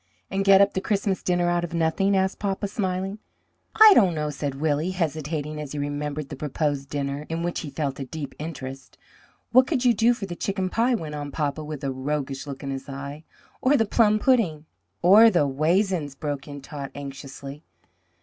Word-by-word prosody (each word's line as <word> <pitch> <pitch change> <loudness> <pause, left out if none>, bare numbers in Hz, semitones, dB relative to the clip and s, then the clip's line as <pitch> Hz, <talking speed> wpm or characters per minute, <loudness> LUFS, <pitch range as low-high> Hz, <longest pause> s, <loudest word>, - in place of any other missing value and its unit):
"And 195 0 0
get 195 0 +7
up 200 - +4
the 190 - -1
Christmas 195 -2 0
dinner 175 -1 +1
out 175 0 +1
of 170 0 -4
nothing?" 170 +4 +2
asked 190 0 0
papa, 200 0 -2
smiling. 195 -1 -3 0.6
"I 435 -1 +9
don't 190 - +4
know," 150 -1 -2
said 140 -1 -4
Willie, 155 +2 0
hesitating, 155 -3 -3
as 150 -2 -7
he - - -4
remembered 145 0 -3
the 145 - -6
proposed 145 -1 -2
dinner, 140 +1 -3
in 165 +1 -2
which 175 0 -2
he 155 - -6
felt 140 -2 -3
a 135 - -4
deep 145 +1 -6
interest. 135 -4 -7 0.5
"What 255 +1 +6
could 260 -6 0
you 245 - +6
do 230 +3 +3
for 215 - -5
the 175 -3 -6
chicken 190 0 -2
pie?" 240 +2 +2
went 155 -8 -5
on 145 -1 -5
papa 150 0 -2
with 150 -1 -7
a 135 - -1
roguish 135 +1 -3
look 140 0 -7
in 135 - -3
his 135 +1 -6
eye, 140 +3 -7 0.4
"or 275 +3 +4
the 225 - +2
plum 215 0 +3
pudding?" 210 - +2 0.4
"Or 210 +6 +8
the 175 -8 +2
waisins?" 155 +1 0
broke 145 -1 -4
in 145 -1 -8
Tot 140 -1 -7
anxiously. 140 +1 -8
155 Hz, 200 wpm, -25 LUFS, 145-195 Hz, 0.6 s, I